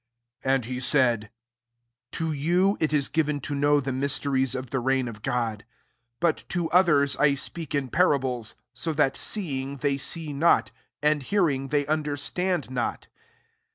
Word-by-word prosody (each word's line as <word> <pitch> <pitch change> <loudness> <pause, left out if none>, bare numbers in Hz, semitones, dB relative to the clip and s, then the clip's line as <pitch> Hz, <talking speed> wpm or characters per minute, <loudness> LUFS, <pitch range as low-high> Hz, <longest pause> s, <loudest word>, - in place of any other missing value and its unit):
10 135 - +1
And 130 -4 -2
he 125 +1 -4
" 120 -1 -2
To 160 -1 -2
you 175 +7 +2
it 155 - +1
is 145 -2 +2
given 150 -2 0
to 145 +1 +2
the 135 0 -3
mysteries 135 -1 0
of 130 -1 -5
the 135 - 0
reigl 125 -4 -1
God: 115 -4 -2 0.6
but 170 -2 +1
to 175 -3 -2
others 145 -7 +4
leftntk 140 -1 0
parables; 130 - +1 0.2
so 165 - -3
that 145 -3 +2
seeing, 140 -8 -2
tl 140 0 0
see 160 -2 -3
not, 160 +5 +3 0.3
and 150 -1 +3
hearing, 140 -4 0
they 145 +1 0
und 150 -1 -1
stand 180 +2 -2
not. 125 -2 -3
140 Hz, 145 wpm, -26 LUFS, 130-155 Hz, 0.6 s, others